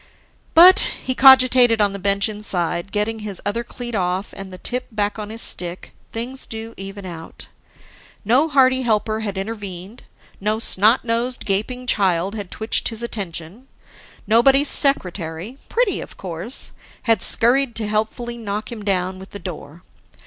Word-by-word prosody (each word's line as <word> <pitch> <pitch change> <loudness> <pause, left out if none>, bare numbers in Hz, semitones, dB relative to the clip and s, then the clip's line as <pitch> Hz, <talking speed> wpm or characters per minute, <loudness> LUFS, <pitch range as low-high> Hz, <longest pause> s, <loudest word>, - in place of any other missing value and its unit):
But, 365 +4 +9 0.2
he 260 - -1
cogitated 255 -3 +6
on 205 -1 +2
the 200 - -6
bench 200 +1 +2
inside, 190 -4 -1
getting 215 +2 -1
his 205 -3 -4
other 230 +4 -1
cleat 240 0 -7
off 185 0 -2
and 195 -1 -9
the 185 - -9
tip 250 +7 -3
back 210 0 -2
on 210 -1 -6
his 225 +1 -3
stick, 175 0 -3 0.2
things 245 +4 -3
do 225 0 -7
even 195 0 -8
out. 165 -3 -10 0.8
No 255 +9 +3
hearty 260 -2 +3
helper 220 -2 0
had 205 -3 -4
intervened, 200 0 -6 0.4
no 210 +2 0
snot 220 +2 +3
nosed, 240 +2 -1
gaping 220 +6 -1
child 190 -4 +1
had 205 -4 -6
twitched 220 +1 -1
his 230 0 -5
attention, 195 +1 -6 0.6
nobody's 270 +6 +4
secretary 185 - 0
pretty - - 0
of - - -11
course 185 +7 -2 0.3
had 225 -2 +2
scurried 245 +1 +3
to 220 -2 -3
helpfully 220 +3 -2
knock 210 +1 -5
him 220 -3 -7
down 185 -2 -1
with 190 - -12
the - - -8
door. 170 -2 -9
215 Hz, 155 wpm, -20 LUFS, 195-240 Hz, 0.8 s, But